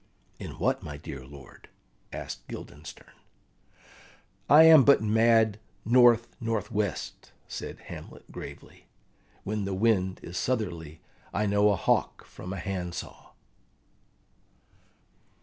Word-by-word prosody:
"In - - -8
what, - - 0
my 75 -1 -7
dear 70 -3 -8
lord?" 70 -1 -14 0.4
asked - - -7
Guildenstern. - - -10 1.4
"I 150 +2 +9
am 160 -3 +9
but 140 -5 +5
mad 110 -1 +3 0.3
north 120 0 +5
north 115 -2 -2
west," 105 -4 -3 0.2
said - - -7
Hamlet - - -11
gravely: - - -11 0.6
"when 105 0 -2
the 100 -1 -2
wind 95 -3 +1
is 85 - -7
southerly 85 -10 -3 0.3
I 105 +2 +1
know 105 +1 +3
a 100 - +3
hawk 85 - 0
from 90 - -9
a 95 - -4
handsaw." 90 -2 -6
105 Hz, 115 wpm, -28 LUFS, 90-115 Hz, 1.4 s, I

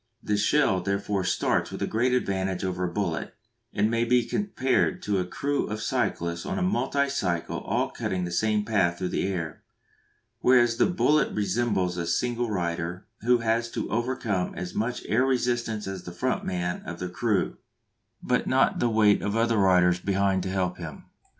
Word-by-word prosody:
The 105 - 0
shell 105 -3 +2
therefore 100 0 -1
starts - - +1
with - - -6
a - - +2
great 120 +4 +1
advantage 95 -6 -1
over 90 -1 -1
the - - -6
bullet, 85 -4 -2 0.4
and 105 - +2
may 115 0 +2
be 120 0 +3
compared 135 - 0
to 100 -2 0
a 90 - -1
"crew" 140 +9 -1
of 105 0 -4
cyclists 85 -5 -1
on - - -3
a 185 - 0
multicycle 140 - 0
all - - 0
cutting 90 -1 -2
the 85 - -5
same 105 +3 +1
path 95 -6 +1
through 90 0 -2
the - - -1
air; 85 -5 -4 0.8
whereas 120 -2 +4
the - - +4
bullet 155 -5 +2
resembles 100 -3 0
a 85 -1 -2
single 120 +4 0
rider, 85 -2 -3
who 125 +2 +3
has 115 +1 +1
to - - -3
overcome 115 -5 -1
as 90 0 -5
much 120 +3 -2
air 115 +4 +3
resistance 120 -4 0
as 95 -1 -5
the 90 - -8
front 130 +8 -1
man 90 -1 -2
of 85 - -7
the 90 - -4
"crew" 100 +2 -1 0.7
but - - +2
has - - -7
not - - +3
the 120 - +2
weight 110 -2 +4
of 105 +1 -2
other 115 0 +2
riders 90 -2 +4
behind 95 0 +1
to 95 - -3
help 90 -2 -1
him. 80 -4 -8
100 Hz, 180 wpm, -26 LUFS, 90-120 Hz, 0.8 s, whereas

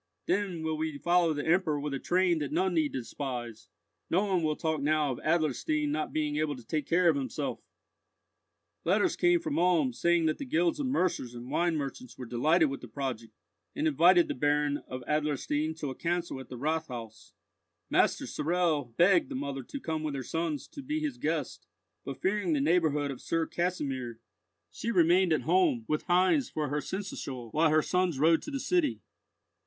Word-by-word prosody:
Then 190 -5 -1
will 160 -1 -1
we 155 -2 -3
follow 175 +2 +3
the 145 -2 -3
Emperor 160 -3 +2
with 145 0 -3
a 135 - -2
train 180 0 +2
that 145 -2 -3
none 185 +4 +1
need 155 -3 +1
despise! 120 -3 -5 0.4
No 190 +5 +2
one 190 -3 +1
will 155 -1 0
talk 160 -2 -1
now 150 -1 +2
of 125 - -5
Adlerstein 155 -2 0
not 155 +1 -2
being 150 -1 -1
able 155 -1 0
to 125 -3 -13
take 150 0 -2
care 175 +1 +3
of 165 - +5
himself!" 135 -4 -3 1.2
Letters 195 +5 +2
came 350 0 +3
from 315 -3 -2
Ulm, 170 -7 +3
saying 170 +4 +2
that 155 - 0
the 280 - -4
guilds 320 +3 +1
of 280 - -1
mercers 180 - -1
and 120 +2 -8
wine 170 +2 +1
merchants 135 -3 -6
were 125 - -6
delighted 155 +8 +3
with 135 0 -5
the 125 - -9
project, 115 -3 -5 0.4
and 300 +2 0
invited 180 - +5
the - - -2
Baron 145 +1 +1
of 130 -1 -6
Adlerstein 150 +1 -1
to 150 -4 -4
a - - -7
council 170 -3 -2
at 130 - -10
the 125 - -7
Rathhaus. 125 -7 -4 0.6
Master - - +2
Sorel 155 -7 -1
begged 175 -4 +4
the - - -5
mother 140 0 -3
to 280 - -6
come 160 -8 -3
with 150 -2 -3
her 135 - -4
sons 160 -1 -3
to 285 - -9
be 300 +3 -2
his 290 -5 -3
guest; 155 - -3 0.4
but 135 - -6
fearing 190 -3 +1
the 145 - +1
neighbourhood 150 -2 +2
of 130 - -8
Sir 165 -1 0
Kasimir, 135 -11 -3 0.5
she 230 - -4
remained 180 -2 +4
at 155 - +2
home, 310 -11 +2
with 155 - -1
Heinz 185 - +3
for 150 -3 -2
her 150 +1 -1
seneschal 135 - -6
while 160 +1 +3
her 155 0 +3
sons 180 -4 0
rode 160 +3 +4
to - - -7
the 275 -2 -3
city. 345 -1 +1
155 Hz, 190 wpm, -29 LUFS, 140-180 Hz, 1.2 s, of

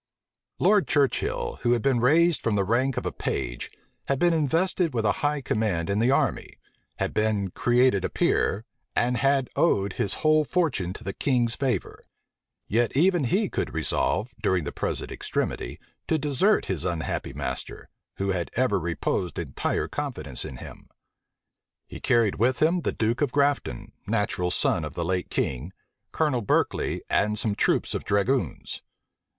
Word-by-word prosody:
Lord 210 -2 +3
Churchill 140 -3 0
had 120 -2 +2
been 130 -3 +2
raised 160 +5 +4
from 115 -3 0
the 100 - +2
rank 120 +6 +1
of - - -2
a - - -1
page - - -3 0.4
had 140 - +1
been 175 +3 +3
invested 165 +1 +1
with 115 -2 0
a 105 - +4
high 145 0 +1
command 105 -8 -1
in 100 - +1
the 115 +3 +3
army, 140 -4 0 0.4
had - - -2
been 105 -3 0
created 120 -2 +3
a - - -1
peer, 105 +4 +1 0.3
and 125 +1 +1
had 135 -1 +2
owed 100 - +2
his 100 - -1
whole 155 0 +5
fortune 145 - 0
to - - -10
the 95 - -4
king's 120 -4 +1
favor: 125 -8 -2 0.6
yet 120 +4 +1
even 175 -2 +3
he 195 - +1
could - - -3
resolve, 105 +8 0
during 95 -5 +1
the 70 - -4
present - - -3
extremity, - - -3 0.3
to 160 - +2
desert 150 +8 +2
his 90 -5 -2
unhappy 85 -3 -2
master, - - -5 0.3
who 100 0 -1
had 90 -2 -2
ever 130 -4 +2
reposed 85 +1 -2
entire 75 -6 -2
confidence 120 - -4
in 65 - -7
him. - - -11 1.0
He - - -9
carried 115 -4 +2
with 125 +4 +2
him 170 +3 +3
the - - -1
duke 115 +4 -1
of 145 -4 +1
Grafton, 140 - 0 0.2
natural 90 0 0
son 85 -1 +1
of 75 +1 -6
the 85 - -2
late 90 +1 -1
king, 65 +7 -2 0.4
Colonel 145 -6 +1
Berkeley, 100 - 0
and 105 +1 +1
some 110 -1 +1
troops 100 - +1
of - - -3
dragoons. 110 +6 -1
120 Hz, 160 wpm, -26 LUFS, 95-145 Hz, 1.0 s, whole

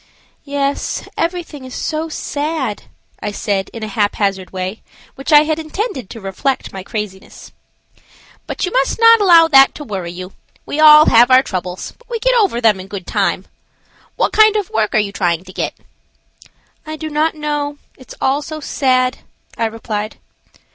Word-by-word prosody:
"Yes, 280 0 -2
everything 335 -4 -3
is 255 -1 -9
so 315 +1 -3
sad," 295 -7 -3 0.3
I 210 - -3
said, 200 -1 -2
in 230 - -8
a - - -3
haphazard 200 -2 -1
way, 185 +3 -5 0.3
which 270 +4 -6
I 295 -1 +8
had 310 0 -1
intended 310 - -4
to 225 - -9
reflect 235 +7 -3
my 190 - -6
craziness. 200 -1 -7 1.0
"But - - -2
you 360 - -4
must - - 0
not 460 -1 +7
allow 340 -4 +7
that 270 -3 +6
to 295 - -7
worry 190 -9 -5
you. 180 +2 -9 0.3
We 295 - -4
all 305 0 +9
have 240 +2 +6
our 255 +1 +6
troubles, 180 -5 -5
but 485 - -25
we 475 - -2
get - - +1
over 405 - +2
them 220 -5 +3
in 185 - -9
good 195 -2 -7
time. - - -1 0.7
What - - 0
kind 435 -1 +5
of 415 -4 -2
work 220 -1 0
are - - +5
you 210 -2 +1
trying 175 -3 -1
to 185 0 -13
get?" - - -3 1.1
"I 310 0 -6
do 310 0 -6
not 310 +2 +1
know; 295 -1 -3 0.2
it's 260 - -13
all 275 +2 +1
so 310 +1 -7
sad," 255 -3 0 0.4
I 230 - -1
replied. 215 -1 -5
265 Hz, 175 wpm, -17 LUFS, 205-310 Hz, 1.1 s, all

